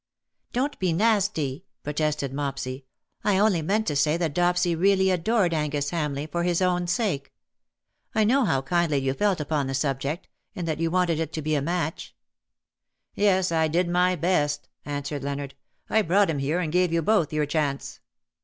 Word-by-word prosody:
'' - - -60
" - - -52
Don't 275 +4 -1
be 185 -2 +1
nasty/' 195 -8 +1 0.2
protested 150 -2 -1
Mopsy. 135 -2 -4 0.2
" - - -60
I 205 -2 +2
only 200 -4 +3
meant 210 +7 0
to 150 - -1
say 150 +3 +2
that 165 -4 -1
Dopsy 175 +1 +2
really 190 +2 +3
adored 185 0 +1
Angus 145 -2 -1
Hamleigh 150 -4 -2
for 170 - -1
his 175 -1 +1
own 180 -1 +1
sake. 175 - -1 0.8
I 220 - +4
know 260 +6 +3
how 135 - +1
kindly 170 0 +1
you 135 -1 0
felt 200 +3 +1
upon 150 -2 -1
the 135 - -2
subject 140 +3 -2
— - - -49
and 175 -2 -4
that 155 -1 -2
you 165 0 +1
wanted 175 -2 +1
it 160 -1 -2
to 155 - -4
be 155 +1 0
a 145 - +1
match." 165 +1 -3 0.5
" - - -62 0.2
"Yes, 190 -3 +2
I 160 -1 +2
did 170 +3 +1
my 180 +1 +2
best/' 150 -4 0 0.2
answered 145 0 -4
Leonard. 140 0 -4 0.2
" - - -47
I 220 - +3
brought 195 0 +3
him 145 - -2
here, 150 +6 0
and 160 -3 -2
gave 180 -1 +3
you 165 0 +1
both 205 -5 +2
your 155 -1 +1
chance." 145 -2 -2
165 Hz, 200 wpm, -25 LUFS, 145-185 Hz, 0.8 s, I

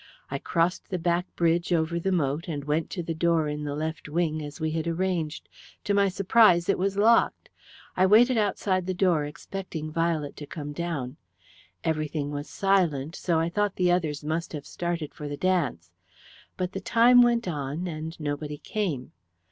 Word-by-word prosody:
I 140 - -2
crossed 170 +4 0
the 185 - -1
back 175 +1 0
bridge 170 +1 +1
over 170 0 +1
the 190 +3 -1
moat 150 -2 0
and 145 -4 -4
went 150 +2 0
to 175 - -4
the 165 - -3
door 165 -1 +2
in 150 0 -3
the 145 -1 -3
left 155 -1 -4
wing, 155 -1 0
as 145 -1 -8
we 160 -1 -1
had 160 +1 -2
arranged. 170 -3 -2 0.4
To 205 - 0
my 200 -1 +4
surprise 190 -2 +4
it 195 - +2
was 195 +1 0
locked. 230 +3 +3 0.5
"I 185 +1 +4
waited 240 +6 +6
outside 195 -3 0
the 185 - -1
door 175 -5 +2
expecting 155 0 -6
Violet 165 -3 -1
to 145 - -8
come 145 -1 -6
down. 150 -5 -4 0.7
Everything 155 -2 -1
was 145 0 -5
silent, 170 -6 +1
so 170 -3 0
I 165 - +1
thought 205 +2 0
the 180 -1 +2
others 155 -5 0
must 160 +3 -2
have 145 -2 -6
started 170 -3 -3
for 150 - -7
the 145 0 -5
dance. 145 - 0 0.7
But 180 0 -2
the 195 - -5
time 240 +4 +6
went 235 -3 +3
on, 150 +1 -3
and 160 -1 -5
nobody 150 0 -3
came. 155 - -3
165 Hz, 180 wpm, -27 LUFS, 150-185 Hz, 0.7 s, waited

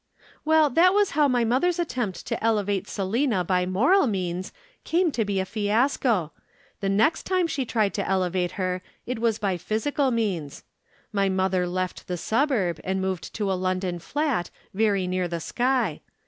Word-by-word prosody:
"Well, 310 -2 +4
that 360 +7 +5
was 410 -1 +3
how 295 0 +3
mother's 255 +8 +2
attempt 245 - -3
to - - -3
elevate 205 -3 +1
Selina 210 +1 0
by 180 0 +1
moral 275 - +3
means 185 -3 -2 0.3
came 340 0 +2
to 235 - 0
be 200 -2 -1
a 190 - 0
fiasco. 215 - +1 0.5
The 195 - -1
next 220 +11 +2
time 370 -2 +2
she 315 -5 -2
tried 215 -4 0
to 200 - -2
elevate 185 -2 0
her, 185 -2 -2 0.2
it 250 -2 -3
was 225 -2 +1
by 195 -4 -1
physical 260 - 0
means. 195 - -2 0.5
My 200 -1 +2
mother 190 -1 +1
left 185 +1 -3
the 180 - -3
suburb, 220 - 0
and 190 0 -1
moved 190 -4 -3
to 205 -3 -1
a - - +2
London 185 -1 -1
flat 275 - -1 0.2
very 200 -2 +1
near 180 0 -1
the 170 -1 -3
sky. 240 - 0
205 Hz, 165 wpm, -25 LUFS, 185-255 Hz, 0.5 s, that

